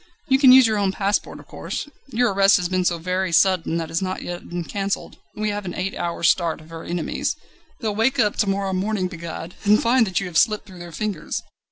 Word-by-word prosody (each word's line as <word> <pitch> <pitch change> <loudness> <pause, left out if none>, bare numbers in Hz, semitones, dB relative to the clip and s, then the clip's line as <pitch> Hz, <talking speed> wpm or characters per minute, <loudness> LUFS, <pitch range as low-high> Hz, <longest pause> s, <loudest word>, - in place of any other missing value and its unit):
You 265 0 +4
can 265 -3 +8
use 260 0 +8
your 215 -2 +1
own 195 -1 +1
passport, 200 +1 -1
of - - -14
course; - - -5 0.2
your 245 -4 +1
arrest 195 +2 +5
has 180 -2 -1
been 185 0 0
so 175 -1 +1
very 185 +2 -2
sudden 175 -1 +3
that 165 - -1
it - - -7
has 165 +2 -1
not 185 0 -3
yet 175 0 -7
been 175 0 -3
cancelled, 195 +3 -3 0.2
and 215 - -5
we 210 - +1
have 205 0 -4
an 180 -2 -6
eight 190 +2 -3
hours' 170 -1 -1
start 170 -3 +2
of 155 +1 -16
our 165 0 -8
enemies. 175 -1 -2 0.5
They'll 220 -3 -1
wake 235 +6 +1
up 210 -3 +2
to 205 - +1
morrow 195 -1 -1
morning, 190 0 -1
begad! 170 -1 -7
and 210 0 +5
find 235 -1 +3
that 190 - 0
you 195 - -4
have 175 -3 +1
slipped 215 -1 +2
through 185 -3 -13
their 175 0 -9
fingers." 195 -2 -3
190 Hz, 245 wpm, -22 LUFS, 175-210 Hz, 0.5 s, can